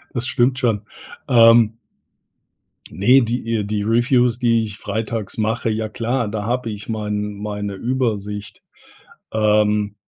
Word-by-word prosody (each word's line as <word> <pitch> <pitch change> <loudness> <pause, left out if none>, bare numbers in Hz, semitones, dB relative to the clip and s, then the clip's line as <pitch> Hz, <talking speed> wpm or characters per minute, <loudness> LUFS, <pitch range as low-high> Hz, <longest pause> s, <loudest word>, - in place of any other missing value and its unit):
Das 120 +1 -1
stimmt 125 +2 +1
schon. 115 -5 0 0.4
Ähm 115 -3 +5 1.1
Ne, 125 +8 +4
die, 115 -1 -2
äh, - - -1
die 105 0 -2
Reviews, 120 +2 +2
die 115 -2 +2
ich 105 -2 -7
freitags 110 0 -4
mache 110 +1 -1
ja, 110 0 -2
klar, 120 +1 -2
da 105 0 -4
habe 120 0 -2
ich 105 0 -8
mein 105 -1 -3
meine 105 -1 -5
Übersicht. 105 -3 -3 0.7
Ähm 105 -1 +2
110 Hz, 130 wpm, -20 LUFS, 105-120 Hz, 1.1 s, Ähm